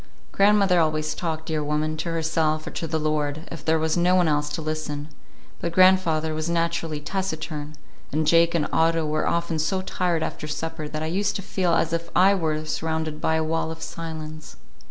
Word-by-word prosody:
Grandmother 195 -3 +4
always 155 -1 +1
talked, 160 -2 -3
dear 155 -2 -1
woman; 150 +1 -1
to 170 - -3
herself 160 -1 0
or - - -5
to 165 - -4
the 160 0 -1
Lord, 150 0 -1
if 165 -4 -7
there 160 0 +3
was 160 0 0
no 180 +1 +3
one 180 -2 +4
else 150 -1 +1
to 150 - -4
listen; 155 -1 -4 0.5
but 170 - -2
grandfather 170 -4 +4
was 155 +1 -2
naturally 165 -2 -1
taciturn, 155 -3 -4 0.4
and 155 +2 0
Jake 165 +2 +4
and 155 -3 +1
Otto 165 0 +3
were 155 0 0
often 170 -1 0
so 185 +5 0
tired 175 -3 0
after 150 - -4
supper 155 0 -4
that 155 +1 -4
I - - -1
used 200 +5 0
to 200 - -3
feel 180 -3 +1
as 165 - +1
if 170 0 -2
I 190 +2 +6
were 155 -4 -1
surrounded 160 0 -2
by 160 - +2
a 160 - +1
wall 160 0 -1
of 160 0 -7
silence. 155 -1 -7
160 Hz, 195 wpm, -24 LUFS, 155-170 Hz, 0.5 s, I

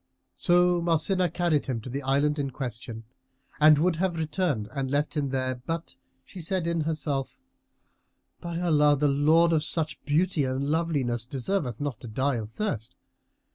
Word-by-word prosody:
So 175 0 +3
Marsinah 175 +2 +2
carried 165 -5 0
him 125 -4 -2
to 115 - -10
the 140 +2 -3
island 145 +2 +1
in 140 -1 -1
question 120 -3 -6 0.6
and 155 0 +7
would 165 +2 +2
have 180 -1 0
returned 155 - -1
and 135 -2 -2
left 145 +3 0
him 145 -2 0
there 130 -1 -2
but 165 0 -3 0.3
she 185 - -9
said 180 +1 -1
in 170 -1 0
herself, 150 -3 -2 1.0
"By 170 -1 -4
Allah, 150 -4 +4
the 145 +2 +2
lord 155 +4 +4
of 155 -2 +2
such 155 -1 -2
beauty 155 +1 +1
and 130 +1 -1
loveliness 140 -8 0
deserveth 130 - -2
not 145 -3 -3
to 120 - -9
die 130 +4 0
of 110 -2 -5
thirst!" 115 - -4
150 Hz, 165 wpm, -27 LUFS, 135-170 Hz, 1.0 s, and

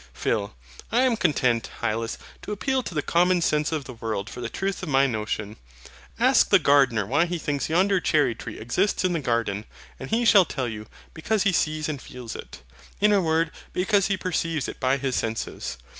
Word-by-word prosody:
PHIL. 100 - -1 0.4
I 245 +3 +3
am 255 -3 +3
content, 130 - +1
Hylas, 115 +1 -2 0.2
to - - -7
appeal 260 +6 0
to 180 - -7
the 150 - 0
common 180 +1 +3
sense 150 -2 +1
of 155 -3 -2
the 130 - -9
world 110 -3 -4
for - - -7
the 115 - -3
truth 195 +6 -3
of 185 - -5
my 135 0 +4
notion. 105 -3 -3 0.6
Ask - - +4
the - - +7
gardener 135 -7 +3
why 145 - +2
he 175 0 -2
thinks 145 -3 -2
yonder 190 +4 +3
cherry 150 -8 +2
tree 115 0 -8
exists 180 - 0
in 180 - +1
the 165 - 0
garden, 115 -6 -1 0.3
and - - -7
he 235 +2 +1
shall 200 -5 +7
tell 130 -6 -3
you, 110 -2 -6 0.3
because 210 +6 0
he 195 - +3
sees 155 -2 0
and 145 -4 -4
feels 125 -3 -8
it; - - -10 0.4
in 210 +1 +4
a 200 - +4
word, 165 -1 +1 0.2
because 200 +1 +2
he 195 -1 0
perceives 165 -5 -2
it - - -7
by 130 +1 +2
his 135 -1 -2
senses. 110 -11 -3
150 Hz, 205 wpm, -25 LUFS, 115-185 Hz, 0.6 s, the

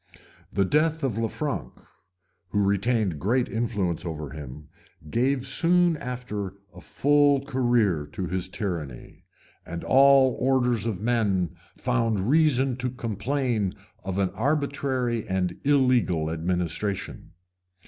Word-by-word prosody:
The 100 -1 +1
death 155 - +1
of 115 -5 -1
Lanfranc, 135 +6 -3 0.8
who 100 +2 +1
retained 100 -3 +1
great 120 - +1
influence 100 -8 -2
over 75 -5 -5
him, 75 0 -9 0.4
gave 130 +2 +1
soon 170 +4 +3
after 110 -7 -5 0.2
a - - -12
full 145 -1 +3
career 120 - +1
to 95 - -3
his 90 +1 -2
tyranny; 85 - -6 0.4
and 85 +1 -6
all 135 -1 +5
orders 125 -4 +1
of 105 -4 -3
men 100 -7 0 0.2
found 115 -3 0
reason 135 -5 +3
to 125 0 -2
complain 120 -2 -2 0.3
of 95 -1 -3
an 95 -2 +1
arbitrary 130 -1 -1
and 95 -2 -1
illegal 125 - +2
administration. 90 +3 -3
115 Hz, 115 wpm, -26 LUFS, 95-130 Hz, 0.8 s, all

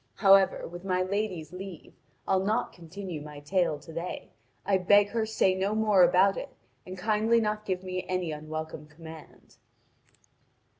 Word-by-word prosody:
However, 195 -1 +4
with 175 +2 -9
my 185 -1 0
lady's 185 -5 -3
leave, 185 -3 -9 0.3
I'll 190 0 +2
not 210 +3 0
continue 175 -1 -7
my 150 -1 -9
tale 170 +1 0
to 160 +3 -13
day, 170 +2 -6 0.3
and 190 -2 +2
I - - -12
beg 205 +2 +5
her 220 0 -1
to - - -8
say 190 -3 +3
no 195 +3 -1
more 215 -3 +4
about 185 +3 +4
it, - - -5 0.4
and 185 +1 -7
kindly 220 +4 +2
not 215 -1 -2
give 185 -1 -2
me 185 0 -4
any 185 -3 -1
unwelcome 155 0 -6
command." 160 +1 -13
185 Hz, 165 wpm, -28 LUFS, 165-200 Hz, 0.4 s, beg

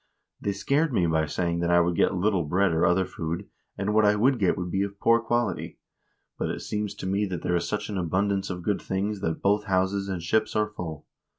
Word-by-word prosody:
They 100 - -1
scared 140 +10 +1
me 95 -8 +2
by 80 -1 +1
saying 85 +2 -1
that 85 0 0
I 85 0 +5
would 85 0 +1
get - - +2
little 95 -1 +1
bread 90 +5 +2
or 80 - +3
other 90 +2 +3
food, 85 +5 -5 0.3
and 100 +2 -1
what 110 0 +4
I 105 0 +4
would 125 +4 +3
get 95 -4 +2
would 90 -1 -3
be 95 - 0
of 100 0 -3
poor 115 +1 +4
quality; 120 +1 -1 0.6
but - - -1
it - - -4
seems 105 -1 -3
to - - -7
me 100 +2 0
that 90 -2 -5
there 90 - +1
is 85 -1 0
such 105 0 -2
an 100 -3 -3
abundance 95 +3 0
of 90 -2 -5
good 100 +1 0
things 100 +1 -2
that 80 -4 -2
both 100 +1 +2
houses 95 0 0
and 90 -3 -3
ships 110 +6 +1
are 105 0 +1
full. 80 -7 -7
95 Hz, 235 wpm, -26 LUFS, 85-105 Hz, 0.6 s, I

